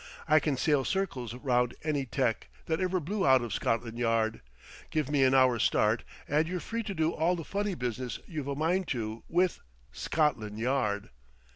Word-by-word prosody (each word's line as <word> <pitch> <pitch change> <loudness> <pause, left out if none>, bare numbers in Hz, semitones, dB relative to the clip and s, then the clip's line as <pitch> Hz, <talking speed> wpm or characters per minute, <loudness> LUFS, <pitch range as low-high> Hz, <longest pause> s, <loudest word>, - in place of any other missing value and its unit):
"I 155 0 +6
can 145 -4 -1
sail 145 0 +2
circles 130 - -2
round 125 -2 +1
any 145 -4 -1
tec. 120 -2 -1 0.2
that 160 +2 -1
ever 185 0 +1
blew 195 +5 -2
out 130 -2 +5
of 115 -3 -4
Scotland 115 +1 -1
Yard! 115 -1 +1 0.5
Give 150 -3 -1
me 140 -2 +3
an 130 0 +4
hour's 130 -4 +4
start, 110 +2 +2 0.2
and 150 +2 +2
you're 180 +1 -2
free 230 +8 -3
to 205 -3 -5
do 160 0 +2
all 170 +3 +1
the 165 - -5
funny 200 +3 -2
business 125 -3 -3
you've 150 -5 -5
a 140 - -2
mind 170 +5 +1
to, 110 -3 -3
with 180 +1 +2 0.3
Scotland 110 - 0
Yard!" 110 -4 0
140 Hz, 180 wpm, -30 LUFS, 120-160 Hz, 0.5 s, I